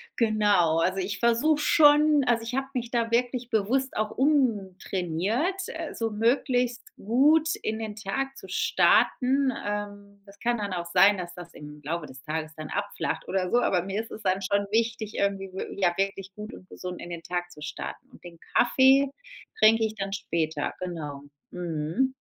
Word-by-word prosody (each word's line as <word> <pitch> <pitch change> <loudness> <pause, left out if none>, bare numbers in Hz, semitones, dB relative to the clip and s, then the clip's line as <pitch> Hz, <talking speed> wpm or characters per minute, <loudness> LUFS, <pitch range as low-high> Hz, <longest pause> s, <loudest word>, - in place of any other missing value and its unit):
Genau, 205 -8 +3
also, 185 +3 +1
ich 195 +2 -3
versuche 240 +6 +3
schon 295 -1 +5
also, 235 -2 +2
ich 240 +2 -4
habe 270 0 -1
mich 240 -2 -3
da 230 -1 -1
wirklich 245 0 0
bewusst 250 +5 0
auch 215 0 0
umtrainiert, 220 - 0
äh, 325 -1 -6
so 225 -1 -2
möglichst 245 +2 +1
gut 300 +9 +3
in 220 0 -3
den 215 -2 -5
Tag 270 +6 -3
zu - - -12
starten. 265 +1 +3
Ähm, 205 -1 -5
das 200 0 -17
kann 240 0 0
dann 200 -3 -3
auch 170 -1 -3
sein, 195 +3 +5
dass 175 -1 -6
das 175 -1 -10
im 150 0 -11
Laufe 160 +2 -3
des 130 +1 -13
Tages 155 0 -4
dann 155 -1 -7
abflacht 205 0 -3
oder 185 -1 -1
so, 245 - +4
aber 180 -7 +1
mir 195 +3 -2
ist 225 - -12
es 215 - -9
dann 190 +1 +1
schon 200 +1 0
wichtig 225 -1 0
irgendwie 195 -1 -1
wie, 190 +1 -6
ja, 175 -2 +3
wirklich 195 0 -2
gut 210 +2 -8
und 185 - -15
gesund 180 -1 -7
in 175 - -8
den 170 -1 -5
Tag 175 0 -3
zu 150 - -14
starten 150 - -7
und - - -18
den 170 -1 -11 0.2
Kaffee 265 +2 +5 0.5
trinke 220 +1 +5
ich 220 0 -4
dann 195 -1 -4
später. 160 -6 -2
Genau, 155 -6 -5 0.3
mhm. 175 +9 -1
205 Hz, 180 wpm, -27 LUFS, 180-245 Hz, 0.5 s, schon